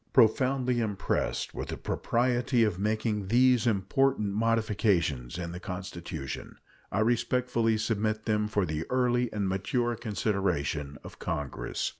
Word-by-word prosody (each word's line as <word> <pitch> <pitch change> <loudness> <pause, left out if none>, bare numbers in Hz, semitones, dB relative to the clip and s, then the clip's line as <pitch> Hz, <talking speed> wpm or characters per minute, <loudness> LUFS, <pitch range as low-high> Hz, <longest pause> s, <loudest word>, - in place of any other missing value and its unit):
Profoundly 125 +1 +3
impressed 105 -4 -1
with - - -5
the - - -4
propriety 120 0 +1
of 105 -5 0
making 105 -1 0
these 125 +2 +4
important 105 +1 +1
modifications 100 - +1
in 85 -2 -4
the 90 - -6
Constitution, 85 -6 -6 0.3
I 100 - +1
respectfully 120 0 +1
submit 110 0 -1
them 105 -1 +1
for 105 -3 +1
the 80 0 -3
early 125 -1 +2
and 105 -2 -1
mature 120 +6 0
consideration 90 -10 -1
of - - -11
Congress. 75 -2 -3
110 Hz, 125 wpm, -29 LUFS, 95-120 Hz, 0.3 s, these